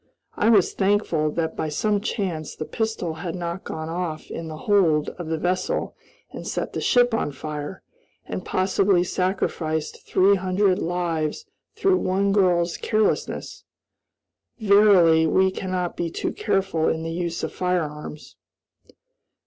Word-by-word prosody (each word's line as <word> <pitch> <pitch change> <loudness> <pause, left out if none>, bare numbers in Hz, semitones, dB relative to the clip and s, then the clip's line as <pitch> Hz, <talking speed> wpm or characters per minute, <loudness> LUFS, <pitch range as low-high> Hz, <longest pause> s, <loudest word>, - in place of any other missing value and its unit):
I 220 - +2
was 205 -6 +4
thankful 190 -6 +1
that 160 -1 -2
by 155 - -2
some 205 +7 0
chance 185 -8 -3
the 155 - -5
pistol 220 -6 -2
had 175 -1 -4
not 175 +1 -4
gone 160 0 -5
off 165 -2 -4
in 165 - -5
the 155 -1 -7
hold 165 -5 +2
of 175 - -8
the 160 0 -1
vessel 180 +3 -1 0.4
and - - -8
set - - -3
the - - -3
ship 245 -2 +3
on 185 -9 0
fire, 150 +5 -6 0.4
and - - -5
possibly 190 -1 +2
sacrificed 175 -4 -2
three 195 +2 +4
hundred 185 +1 +1
lives 170 - -2 0.3
through 385 -1 +3
one 195 - +1
girl's 175 -4 +2
carelessness. 215 -1 -1 0.9
Verily 200 -7 +5
we 190 +4 +3
cannot 185 -2 -3
be 170 -1 -2
too - - -3
careful 195 -6 0
in 160 0 -2
the 165 - -3
use 170 -1 -3
of - - -3
firearms. 155 -5 -3
180 Hz, 140 wpm, -24 LUFS, 160-195 Hz, 0.9 s, Verily